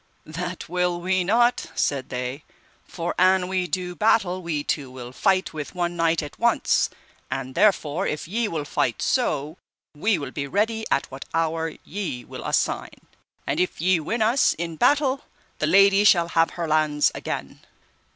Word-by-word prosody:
That 175 +3 -5
will 180 0 0
we 185 +1 +1
not, 240 +6 +2
said 140 -3 -1
they, 125 +3 -4 0.4
for 170 -1 -4
an 185 0 +4
we 185 -1 -1
do 180 0 -3
battle, 190 -4 +2
we 160 -4 -2
two 140 -3 -2
will 125 -1 -9
fight 190 +6 +1
with 150 +2 -6
one 175 -1 -1
knight 165 -1 +1
at 145 - -9
once, - - +2 0.4
and 130 -1 -4
therefore 170 -4 +2
if 150 - -3
ye 225 +5 -1
will 160 -6 -3
fight 120 -5 -1
so, 155 - 0 0.4
we 200 +6 +1
will 140 -4 -6
be 140 0 -4
ready 220 +7 0
at - - +1
what 135 +1 -8
hour 165 0 0
ye 165 - -5
will - - -8
assign. - - -1 0.4
And 145 - -1
if 180 - -1
ye 180 +1 +3
win 220 +9 -1
us 235 +5 +3
in 165 0 -4
battle 275 - +2 0.3
the - - +1
lady 195 +1 +6
shall 170 -4 +5
have 165 0 +3
her 170 -1 -2
lands 155 -1 +2
again. - - -5
170 Hz, 170 wpm, -24 LUFS, 150-190 Hz, 0.4 s, lady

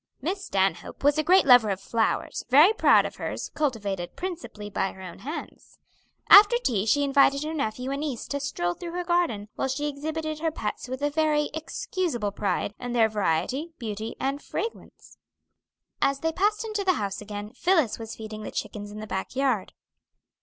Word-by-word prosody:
Miss 375 +8 -3
Stanhope 190 - -1
was 290 +2 +4
a - - +2
great 370 +5 +5
lover 245 -5 +7
of 195 -1 -1
flowers, 225 +2 -1
very 300 - +7
proud - - +5
of - - -6
hers, - - -4
cultivated 205 - -2
principally 345 - -6
by 195 -1 -2
her 190 - -13
own 180 -2 -9
hands. 300 +6 -8 0.5
After 415 +4 +9
tea 225 - 0
she 285 +5 +3
invited 280 0 +4
her 310 +1 -3
nephew 250 -2 -2
and 275 - -2
niece 285 -6 -4
to 285 - -1
a - - -4
stroll 175 -11 -2
through 340 - -8
her 355 0 -2
garden, 340 - 0
while - - -2
she 280 +3 -2
exhibited 310 +2 -4
her 325 +1 0
pets 220 -6 -4
with 260 +2 -5
a 290 - +1
very 300 -1 +1
excusable 320 - -2
pride 205 0 -1
in 245 -1 -4
their 225 -2 +4
variety, 215 - -1
beauty, 220 -2 -5
and 275 +2 -2
fragrance. 455 - -7 0.8
As 275 0 +1
they 325 - +1
passed 420 +6 +1
into 425 -2 -2
the 375 -1 +3
house 200 - -3
again, 205 0 -7
Phillis 330 - +2
was 225 -1 -7
feeding 215 -1 -7
the - - -5
chickens 205 -1 -5
in 210 +1 -8
the - - -5
back 190 +3 -4
yard. 260 -7 0
275 Hz, 190 wpm, -26 LUFS, 215-320 Hz, 0.8 s, After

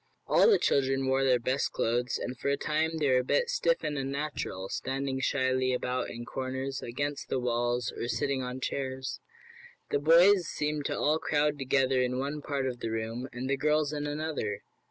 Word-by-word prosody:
All - - +5
the 420 - +6
children 135 -1 +1
wore 135 +1 +2
their 130 -2 +4
best 130 +3 -1
clothes, 120 +1 0
and 125 - -4
for 135 - -2
a 140 - +2
time 160 +3 0
they 150 -2 +1
were 130 - +5
a - - -1
bit 480 - +1
stiff - - +1
and 145 -2 -2
unnatural, 135 -8 -3
standing 135 0 -2
shyly 130 -1 +1
about 125 0 -2
in 120 0 -7
corners, 130 +1 -4
against 145 +4 -3
the 130 - 0
walls, 120 -1 0
or 120 - -3
sitting 140 +1 0
on 125 +1 -5
chairs. 130 0 -3 0.7
The - - +2
boys 170 +4 +6
seemed 150 -1 -2
to - - -1
all 155 +2 +2
crowd 150 -1 +1
together 135 -1 +2
in 125 0 0
one 145 +3 -3
part 140 -2 -2
of 125 -2 -3
the 115 - -3
room, 115 +3 -3
and 125 +2 -5
the 140 0 +1
girls 150 +1 +1
in 145 0 -2
another. 145 -8 -3
135 Hz, 195 wpm, -29 LUFS, 125-145 Hz, 0.7 s, the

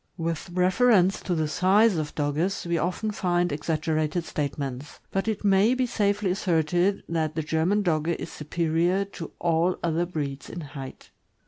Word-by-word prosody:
With 165 0 -3
reference 185 +2 +3
to 180 - -1
the 160 -1 0
size 195 +6 +4
of 150 -1 -3
Dogges, 155 +7 -1
we 170 0 0
often 185 +6 -1
find 175 -3 0
exaggerated 155 +2 -1
statements; 140 -2 -4
but 195 +2 -1
it 215 -1 -2
may 200 +5 +4
be 255 0 +1
safely 205 -4 0
asserted 180 +1 +1
that 160 -2 -1
the 160 - -1
German 165 +7 +1
Dogge 165 -1 +1
is - - -7
superior 170 +5 0
to 185 -5 -8
all 170 +1 +1
other 170 +1 0
breeds 145 -5 -4
in 175 - -6
height. 145 -3 -9
170 Hz, 155 wpm, -26 LUFS, 155-195 Hz, -, size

